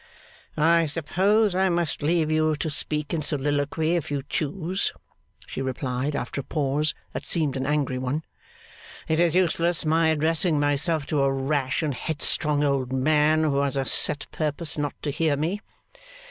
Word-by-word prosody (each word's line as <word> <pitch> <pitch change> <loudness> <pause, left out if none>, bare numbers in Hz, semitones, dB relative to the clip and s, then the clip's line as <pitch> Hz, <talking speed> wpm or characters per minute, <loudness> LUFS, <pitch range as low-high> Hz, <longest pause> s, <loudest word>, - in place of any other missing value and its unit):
'I 165 +1 +4
suppose 190 +8 +1
I 190 +1 +2
must 170 -3 -1
leave 160 +1 +1
you 155 0 +2
to 155 +1 -3
speak 150 +1 -1
in 165 - 0
soliloquy 145 +2 0
if 170 - -2
you 140 -2 -2
choose,' 170 +5 -2 0.5
she - - -5
replied, 130 +2 -2
after 140 +2 -3
a - - -14
pause 150 0 0 0.2
that - - -4
seemed 155 -5 +1
an 130 0 -2
angry 145 -3 0
one. 135 +5 -2 0.8
'It 160 0 +1
is 170 -1 +3
useless 170 -2 +2
my 160 +1 +3
addressing 160 +1 +2
myself 145 +2 +1
to 145 -1 0
a 135 0 +3
rash 135 +1 -1
and 150 -2 0
headstrong 150 0 0
old 135 -3 0
man 150 +3 +3
who 140 -3 +1
has 140 0 0
a 135 - 0
set 145 +4 +2
purpose 155 0 -2
not 145 -1 -2
to 145 - -1
hear 155 -1 +1
me. 170 +8 -2
150 Hz, 165 wpm, -25 LUFS, 140-165 Hz, 0.8 s, I